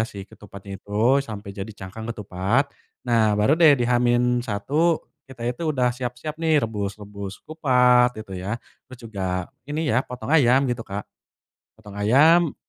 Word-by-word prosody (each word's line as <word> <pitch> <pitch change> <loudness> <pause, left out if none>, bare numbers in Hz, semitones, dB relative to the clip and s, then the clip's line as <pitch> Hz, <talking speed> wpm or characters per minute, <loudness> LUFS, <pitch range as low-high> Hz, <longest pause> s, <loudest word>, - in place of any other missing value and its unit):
si 100 -1 -8
ketupatnya 100 -1 -11
itu 110 +7 +2
sampai 105 -6 -7
jadi 95 +2 -6
cangkang 105 +2 -9
ketupat, 105 +5 -1 0.3
nah 110 -4 +2
baru 105 +7 +3
deh 155 -4 +7
di 120 - 0
H-1 125 +5 +1 0.2
kita 125 -3 -8
itu 125 +6 -4
udah 130 -4 +2
siap-siap 125 +5 -5
nih 160 -2 +3
rebus-rebus 100 -3 -5
kupat 125 -5 +4
gitu 110 -3 -10
ya 95 +5 -3 0.3
terus 130 -1 -12
juga 90 -4 -3 0.2
ini 150 +3 -2
ya 125 0 +3
potong 125 +2 -8
ayam 135 -3 +5
gitu 120 -1 -2
Kak, 100 -2 -6 0.7
potong 105 -2 -13
ayam. 155 +9 +4
120 Hz, 145 wpm, -23 LUFS, 105-135 Hz, 0.7 s, deh